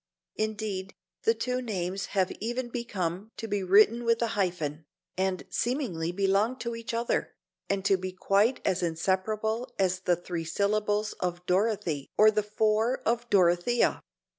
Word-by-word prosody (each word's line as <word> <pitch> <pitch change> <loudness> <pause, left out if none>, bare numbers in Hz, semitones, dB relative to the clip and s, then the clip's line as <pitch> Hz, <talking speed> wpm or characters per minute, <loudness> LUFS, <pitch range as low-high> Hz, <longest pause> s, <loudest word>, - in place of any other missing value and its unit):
Indeed, 210 -3 -3 0.3
the 225 - +4
two 250 +3 -1
names 195 -4 -3
have 185 -1 +3
even 240 +3 -3
become 205 -5 -3
to 225 - -5
be 205 -2 -1
written 210 +5 +5
with 230 -1 +2
a 230 - 0
hyphen, 170 -8 -2 0.3
and 190 0 -1
seemingly 230 - -1
to 175 - -6
belong 200 +5 +2
to 235 -1 -4
each 230 +2 -5
other, 235 +1 -1 0.3
and 195 -1 -1
to 195 - +4
be 185 0 -4
quite 200 +6 +2
as 185 - +1
inseparable 200 +7 -1
as 185 -1 +1
the 180 -1 +2
three 175 -1 -5
syllables 210 +4 0
of 180 0 -3
Dorothy 180 -7 0
or 215 +1 +7
the 210 0 +1
four 215 +3 +1
of 235 +1 0
Dorothea. 180 +5 +3
205 Hz, 155 wpm, -28 LUFS, 185-225 Hz, 0.3 s, or